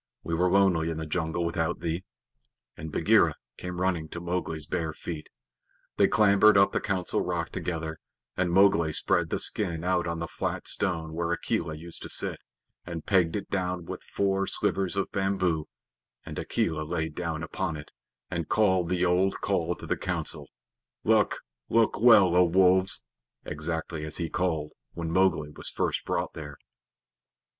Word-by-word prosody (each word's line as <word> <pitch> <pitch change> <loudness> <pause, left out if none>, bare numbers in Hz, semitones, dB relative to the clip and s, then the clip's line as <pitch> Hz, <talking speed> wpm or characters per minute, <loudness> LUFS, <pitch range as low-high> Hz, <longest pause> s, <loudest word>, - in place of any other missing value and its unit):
"We 85 - -4
were 90 +2 +2
lonely 90 -4 +3
in 80 - -3
the 80 - -4
jungle 80 +1 -1
without 80 -1 -1
thee," 85 +2 -2 0.7
and 80 0 -7
Bagheera - - +4 0.2
came 90 0 -5
running 90 -4 0
to 85 - -6
Mowgli's 85 -3 -3
bare 80 -1 -2
feet. 80 -1 -7 0.7
They - - +5
clambered 105 0 +5
up 100 0 +5
the - - -1
Council 95 -3 -1
Rock - - -2
together, 80 -2 -4 0.4
and 95 -1 0
Mowgli 85 -4 +4
spread - - +1
the - - 0
skin 85 -6 -1
out 90 -1 +1
on 85 0 -2
the 85 0 -3
flat - - -4
stone 80 -5 -1
where 85 +1 -1
Akela 85 -2 -1
used 85 +2 -7
to - - -6
sit, - - +1 0.4
and 85 -2 -6
pegged 90 -5 +3
it 100 - -5
down 90 -3 -1
with - - -6
four 95 0 0
slivers 95 -1 0
of 100 - -1
bamboo, 95 -5 0 0.6
and - - -6
Akela 80 -2 -1
lay 80 +1 -2
down 80 0 -4
upon 80 -1 -3
it, 75 - -11 0.4
and 85 -2 -3
called 95 -5 +3
the 90 0 +1
old 90 +2 +2
call 90 -3 0
to - - -10
the - - -1
Council, - - -2 0.6
"Look - - +3 0.3
look 115 -2 +3
well, 105 -7 +7
O 90 - +7
Wolves," 95 +2 +4 0.4
exactly 80 +1 -3
as 75 0 -5
he 85 - -2
had 80 - -5
called 80 -5 -1 0.2
when 85 -1 -4
Mowgli 85 -5 +2
was - - -6
first - - -1
brought - - -1
there. - - -8
85 Hz, 165 wpm, -28 LUFS, 80-95 Hz, 0.7 s, well